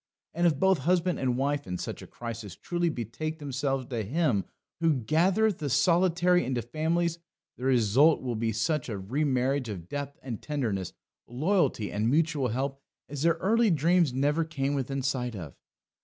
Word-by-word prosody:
And 175 +2 +2
if 155 -5 +2
both 190 +1 +3
husband 180 +4 +1
and 125 -2 0
wife 140 -2 -1
in 90 0 -3
such - - -5
a - - -10
crisis 115 -5 -7
truly 175 -1 -1
betake 155 +4 -4
themselves 135 -2 -2
to 120 -3 -3
Him 125 - +1 0.3
who 165 -2 +3
gathereth 180 - +2
the 145 - -2
solitary 175 +5 +3
into 125 -2 -2
families, 165 +6 -1 0.4
the 125 - -7
result 130 +5 +4
will 125 -2 -3
be 115 +1 0
such 130 +6 -1
a 105 - -3
remarriage 130 +4 0
of 90 -5 -6
depth 145 +2 -5
and 120 -5 -5
tenderness, 110 - -2 0.3
loyalty 140 - 0
and 105 +2 0
mutual 150 -2 +2
help, 135 +4 -3 0.3
as 140 -1 -6
their 165 +1 +3
early 225 +3 +2
dreams 170 -1 +3
never 145 +5 +1
came 145 -3 -2
within 135 0 -2
sight 125 -3 -1
of. 85 -7 -7
140 Hz, 170 wpm, -28 LUFS, 120-165 Hz, 0.4 s, result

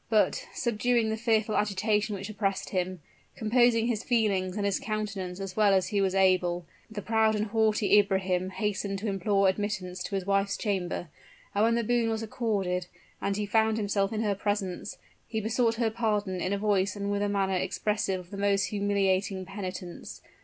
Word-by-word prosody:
But, 215 -2 +2
subduing 235 -1 +1
the 220 - 0
fearful 220 -1 +1
agitation 210 +1 +1
which 195 0 -6
oppressed 200 -2 -2
him 185 -2 -2 0.3
composing 230 0 +3
his 235 -2 -1
feelings 200 -5 +1
and 205 - -1
his 200 -1 +1
countenance 200 -4 -4
as 195 -1 -5
well 205 -2 +4
as 190 - +1
he 205 -2 +1
was 190 -1 +1
able, 180 -2 +2 0.2
the 215 -2 -6
proud 220 -1 +2
and 210 0 0
haughty 215 -1 +3
Ibrahim 190 -2 0
hastened 195 0 -2
to 210 +3 -4
implore 195 0 +2
admittance 190 -2 -2
to 195 - -3
his 190 -2 -2
wife's 195 0 +1
chamber, 185 -5 -2 0.4
and 205 - +2
when 230 0 +3
the 235 - +1
boon 235 0 +1
was 225 0 -2
accorded, 195 -6 -1 0.3
and 200 0 -1
he 210 - -1
found 220 +1 +2
himself 200 -2 0
in 220 -1 -1
her 205 -2 +1
presence, 200 -2 -3 0.3
he 220 - -2
besought 225 +1 +1
her 225 -1 0
pardon 210 -5 -1
in 185 - -1
a 200 - +1
voice 200 -1 +1
and 200 0 -3
with 205 0 0
a 205 - +1
manner 195 -1 +1
expressive 195 +1 -1
of 180 0 -13
the 200 - -6
most 200 0 +2
humiliating 195 -2 0
penitence. 185 -2 -7
205 Hz, 185 wpm, -28 LUFS, 190-220 Hz, 0.4 s, well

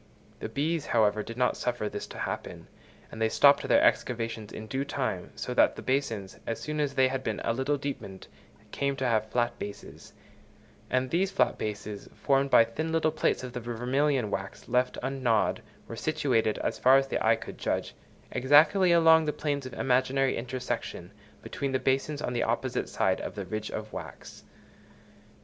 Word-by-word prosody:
The - - -5
bees, 155 +2 -1
however, 110 -2 +2
did 115 +2 -8
not 125 -1 +2
suffer 120 -3 -2
this - - -5
to - - -10
happen, - - -5 0.5
and 110 - -8
they 110 - +3
stopped 140 +4 +5
their 285 - +4
excavations 115 - 0
in 110 - -7
due 130 +5 -2
time; 130 -10 -3
so - - -4
that - - +4
the - - -8
basins, 115 -8 -2
as 115 - -2
soon 150 0 -4
as 145 -2 -1
they 130 -1 +5
had 130 0 -3
been 110 - -2
a 115 - +1
little 130 +4 0
deepened, 115 -9 -6 0.4
came 140 0 -1
to 135 -1 -3
have 110 -3 +1
flat 120 0 0
bases; 100 0 -9 0.8
and 130 0 0
these 185 +3 +2
flat - - +1
bases, 105 -1 -5
formed 135 0 +1
by 115 - +7
thin 155 +8 -4
little 160 -1 +2
plates 155 - 0
of 125 -1 -6
the 125 - -3
vermilion 125 +1 0
wax 95 -1 -5
left 125 +1 +1
ungnawed, 130 -4 +1 0.3
were 115 - -7
situated, 125 -6 0
as - - -2
far 130 +1 +6
as 135 - +2
the 135 - -2
eye - - +5
could - - -9
judge, - - -2 0.4
exactly 150 +9 +5
along 160 -1 +6
the 150 - +1
planes 145 -3 -3
of 130 - -10
imaginary 130 +1 +1
intersection 120 -6 -4 0.3
between 140 -1 -3
the - - +3
basins 135 +3 0
on 125 - -2
the 120 - 0
opposite - - -1
side - - 0
of - - -6
the - - -5
ridge 110 0 -4
of 110 0 -6
wax. - - -9
130 Hz, 185 wpm, -28 LUFS, 115-140 Hz, 0.8 s, by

